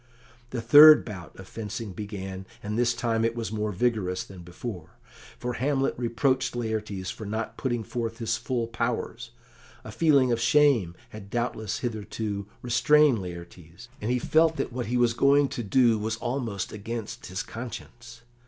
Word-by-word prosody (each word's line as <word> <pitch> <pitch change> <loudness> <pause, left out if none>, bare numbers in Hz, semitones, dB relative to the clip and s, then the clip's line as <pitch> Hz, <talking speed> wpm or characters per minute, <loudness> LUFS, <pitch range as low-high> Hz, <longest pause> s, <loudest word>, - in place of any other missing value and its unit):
The 120 -2 -4
third 150 +6 +9
bout 95 -7 -9
of 95 - -10
fencing 115 -1 -6
began, 95 -2 -6 0.2
and 105 +1 -3
this 120 0 +2
time 115 -1 0
it 115 0 0
was 115 -2 -4
more 105 -1 -2
vigorous 100 -3 0
than 95 -2 -12
before, 90 0 -8 0.4
for 125 0 -3
Hamlet 135 +1 0
reproached 125 +2 0
Laertes 110 -5 -3
for - - -9
not 110 +2 -4
putting 120 -4 -2
forth 115 -1 -4
his 115 -2 -1
full 125 -3 -2
powers. 115 +1 -3 0.5
A 110 - -8
feeling 140 -1 +3
of 115 -1 0
shame 120 - +3
had 105 -2 -10
doubtless 120 +1 -2
hitherto 105 -3 -4 0.2
restrained 140 +2 +4
Laertes, 85 +1 -10
and 105 - -2
he 125 - +2
felt 160 +6 +3
that 130 - -3
what 125 -2 -3
he 125 +2 0
was 120 -1 +3
going 140 +3 +4
to 125 - -4
do 115 0 +3
was 110 +1 -2
almost 120 -6 -3
against 115 +2 -6
his 95 0 -4
conscience. 120 0 -9
115 Hz, 160 wpm, -27 LUFS, 105-125 Hz, 0.5 s, third